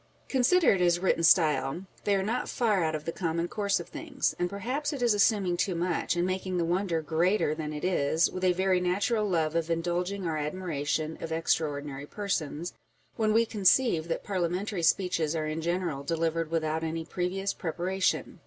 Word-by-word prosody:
Considered 265 - +3
as 175 -1 +4
written 180 -2 +1
style, 165 0 +3 0.2
they 205 - +3
are 190 - 0
not 230 +5 -2
far 215 -7 +1
out 155 -1 0
of 155 - -6
the 165 - -2
common 170 -1 -2
course 200 0 0
of 170 - -7
things; - - -2
and 175 0 0
perhaps 255 +10 -3
it 285 - -4
is 235 -3 +4
assuming 200 -3 +2
too 185 0 0
much, 175 0 0
and 175 0 +1
making 185 0 -2
the 170 - +1
wonder 175 -2 0
greater 165 +2 +1
than 155 -1 -4
it 150 -1 -6
is, 160 -2 +2
with 185 - -6
a 185 - +5
very 185 0 +2
natural 205 +4 0
love 160 -4 +1
of 165 0 -1
indulging 175 +3 -1
our 160 -2 -1
admiration 155 -1 -2
of 165 - -5
extra 160 -1 +1
ordinary 145 -1 -6
persons, 175 -5 -3 0.4
when 215 -1 +1
we 225 +2 +4
conceive 205 -4 +3
that 165 - -3
parliamentary 185 +1 -2
speeches 165 -2 +1
are 155 -1 -1
in 155 +1 -3
general 170 -4 -1
delivered 165 +1 -1
without 160 -1 -1
any 160 0 -3
previous 190 +3 -2
preparation. 185 +2 -1
175 Hz, 185 wpm, -28 LUFS, 160-195 Hz, 0.4 s, a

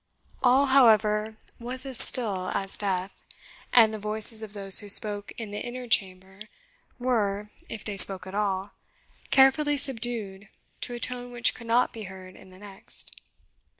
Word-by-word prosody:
All, 260 +2 +3
however, 220 -5 +2 0.2
was 250 +2 -3
as 265 -3 0
still 195 -7 +3
as 195 0 -4
death, 190 -2 -4 0.6
and 225 -3 +4
the 215 - -7
voices 215 +2 0
of 215 -2 -9
those 195 -2 +3
who 205 - -8
spoke 205 0 +2
in 220 -3 -8
the 205 - -6
inner 250 +1 -8
chamber 190 -3 -1 0.6
were, 210 -5 -3 0.2
if 220 - -9
they 205 -2 -6
spoke 190 -2 +7
at 190 - -11
all, 200 -1 -3 0.6
carefully 275 +2 +3
subdued 225 -7 -2 0.3
to 245 - -5
a - - -8
tone 245 0 -2
which 240 -1 +2
could 235 - -13
not 235 +2 0
be 220 -2 -9
heard 185 -1 -13
in 190 - -17
the 185 - -18
next. 195 -1 -6
215 Hz, 160 wpm, -25 LUFS, 195-245 Hz, 0.6 s, spoke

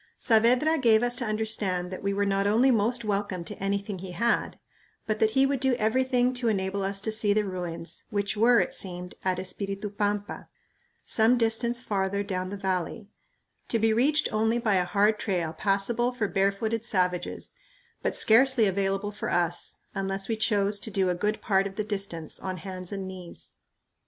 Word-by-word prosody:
Saavedra 250 +8 +3
gave 230 -3 +4
us 245 0 +2
to 250 - -2
understand 215 -5 0
that 185 - -6
we 200 - -1
were 200 +1 0
not 195 0 +1
only 235 +6 +4
most 235 +1 +1
welcome 200 -3 -2
to 165 - -7
anything 200 0 -2
he 185 0 -7
had, 235 +7 0 0.5
but 215 -1 -2
that 220 - +4
he 270 - +6
would 275 -1 0
do 265 -1 +2
everything 250 +2 +1
to 245 -1 -1
enable 195 -2 0
us 195 0 -2
to 220 - -1
see 215 -1 +2
the 210 0 +1
ruins, 175 -3 -5
which 200 0 -2
were, 235 +3 +5
it - - 0
seemed, 180 -1 -5
at 185 -1 0
Espiritu 195 +2 -4
Pampa, 205 0 -3 0.6
some 225 +3 +3
distance 235 +1 0
farther 200 -1 -1
down 185 -2 -3
the 200 - -5
valley, 190 +1 -3 0.6
to 230 - 0
be 225 0 +2
reached 285 +7 +2
only 220 +2 +2
by 230 -3 +1
a 180 - +1
hard 205 +3 +2
trail 175 -5 -1
passable 205 +7 0
for 240 -4 -2
barefooted 200 +4 0
savages, 180 -6 -1 0.5
but - - -1
scarcely 240 +1 +6
available 195 +1 0
for 210 - -5
us 175 0 0
unless 195 0 -2
we 225 - 0
chose 205 -2 +1
to 220 - -4
go 190 -2 +1
a - - +2
good 210 +5 -2
part 195 -1 +2
of 195 - -10
the 215 - -1
distance 195 -6 -4
on 185 -1 -4
hands 185 0 -7
and 195 -2 -4
knees. 185 -2 -8
205 Hz, 185 wpm, -27 LUFS, 190-225 Hz, 0.6 s, he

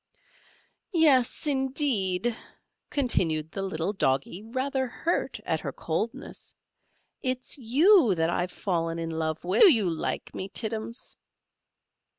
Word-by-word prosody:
"Yes, 280 -7 +4
indeed," 260 -7 +1 0.5
continued 165 - +1
the 195 - -4
little 190 0 -2
Doggy, 140 +1 0
rather 260 +4 -2
hurt 330 +7 -2
at - - 0
her - - -4
coldness: - - -5 0.7
"it's 255 -1 -2
you 270 - +5
that 165 0 +1
I've 175 +1 -1
fallen 165 -3 -2
in 165 0 -3
love 160 -1 -2
with. 180 +3 +1
Do 400 - +10
you 220 -8 +2
like 165 -2 -3
me, 190 - -5
Tittums?" 225 +2 -4
215 Hz, 120 wpm, -27 LUFS, 170-260 Hz, 0.7 s, Do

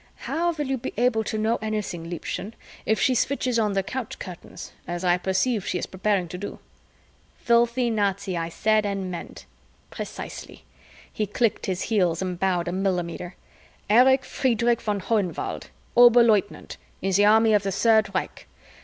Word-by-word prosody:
"How 345 +2 0
will 300 -2 -3
you 265 -1 -2
be 260 - -6
able 235 -2 +2
to 215 - -3
know 220 +2 +1
anything, 210 -6 -4
Liebchen, 185 +5 -5 0.3
if 220 - +2
she 260 - +3
switches 255 -1 0
on 210 -2 +1
the 195 0 0
couch 250 +2 -5
curtains, 180 -3 -9 0.2
as 175 +1 -4
I 180 0 +3
perceive 190 +4 0
she - - -1
is - - -3
preparing 190 -1 -1
to 180 - -7
do?" 205 - -6 0.8
"Filthy 235 +1 +2
Nazi 200 -3 -1
I 165 -1 -2
said 215 +5 +2
and 195 -2 -3
meant." 175 - -8 0.5
"Precisely." - - -8 0.5
He 215 - -2
clicked 230 +1 0
his 185 -1 -2
heels 180 -7 +1
and 180 -2 -3
bowed 180 -2 0
a - - -1
millimeter. 180 -2 -2 0.6
"Erich 260 +4 +5
Friederich 235 -2 +1
von 205 -2 -2
Hohenwald, 200 -4 -2 0.3
Oberleutnant 235 -4 +4 0.3
in 195 - 0
the 200 +2 +4
army 220 +1 +5
of 210 - +4
the 195 0 -2
Third 220 +1 +3
Reich. - - -4
210 Hz, 160 wpm, -25 LUFS, 185-235 Hz, 0.8 s, Erich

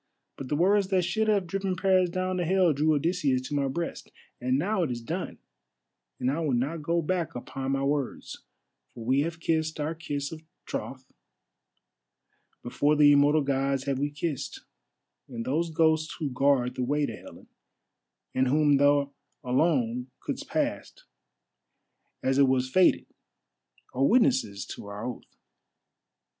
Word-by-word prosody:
But 135 - -7
the 150 - 0
words 195 +5 +3
that 190 -2 +1
should 195 +6 0
have 205 -3 +2
driven 195 +1 -2
Paris 185 -1 +3
down 185 +1 -2
to 180 - 0
Hell 180 -1 +3
drew 155 +2 +2
Odysseus 145 -4 0
to - - -5
my 140 -1 +1
breast. 170 +6 -5 0.3
And 130 +1 +1
now 190 +6 0
it 165 - 0
is 120 -1 -3
done, 115 - -5 0.8
and 125 +1 +1
I 145 - -2
will 150 -6 0
not 145 +7 -1
go 170 +2 0
back 175 0 -2
upon 135 +2 -4
my 135 0 0
words, 140 -2 -3 0.5
for 115 - -8
we 130 +3 +2
have 165 +2 -3
kissed 160 -1 -1
our 150 +2 -1
kiss 145 -3 -4
of 160 -1 -8 0.2
troth, 130 -1 -5 1.6
before 145 +5 +1
the 145 -1 +6
immortal 145 +1 +4
Gods 135 -1 0
have 135 -1 -1
we 145 +1 0
kissed, 145 -1 -4 0.7
and 115 -3 -6
those 165 +6 0
ghosts 160 0 +1
who 150 -5 -3
guard 125 -1 +2
the 125 - -3
way 145 +3 +1
to 115 - -5
Helen, - - -14 0.9
and 130 0 +2
whom 145 +1 +4
thou 145 0 +3 0.3
alone 125 -2 +1
couldst - - -5
pass, - - -2 1.3
as 135 +1 +2
it 140 - +6
was 130 0 +1
fated, 185 +3 +4 0.9
are 130 - 0
witnesses 225 - +2
to 100 - -9
our 100 +2 -6
oath. 125 - -8
145 Hz, 155 wpm, -27 LUFS, 130-170 Hz, 1.6 s, the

